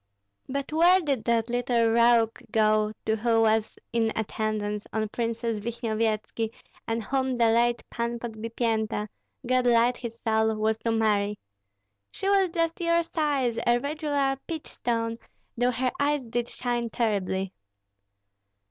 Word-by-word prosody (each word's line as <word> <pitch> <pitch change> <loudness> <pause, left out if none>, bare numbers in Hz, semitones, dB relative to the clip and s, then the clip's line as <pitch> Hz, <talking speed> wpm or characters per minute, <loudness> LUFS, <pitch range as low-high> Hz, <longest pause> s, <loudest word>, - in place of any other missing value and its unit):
But 280 +2 -3
where 350 +4 +6
did 275 - -1
that 230 -1 +2
little 240 -1 +1
rogue 230 -1 +4
go 215 -1 +3
to 220 - +2
who 225 0 +2
was 220 -1 +2 0.2
in 225 -1 +2
attendance 215 -1 -2
on 215 0 -1
Princess 230 -1 -2
Vishnyevetski, 225 0 -2 0.4
and 225 0 -1
whom 260 +2 -1
the 230 -1 +4
late 240 +1 +2
Pan 235 0 -2
Podbipienta 225 -2 -2 0.4
God 255 0 +2
light 240 +1 +4
his 235 -1 -7
soul! 220 -1 +1
was 220 +1 0
to 230 - -1
marry? 210 -2 +1 0.7
She 385 - -5
was 395 -2 +4
just 330 0 -1
your 335 0 +3
size, 285 -8 0
a 240 0 +5
regular 285 -1 -1
peach 320 -2 -5
stone, 230 -1 -2 0.4
though 245 +1 +2
her 250 +1 0
eyes 290 -1 +1
did 235 +1 -2
shine 240 -1 -2
terribly." 195 -4 -1
235 Hz, 140 wpm, -27 LUFS, 220-255 Hz, 0.7 s, where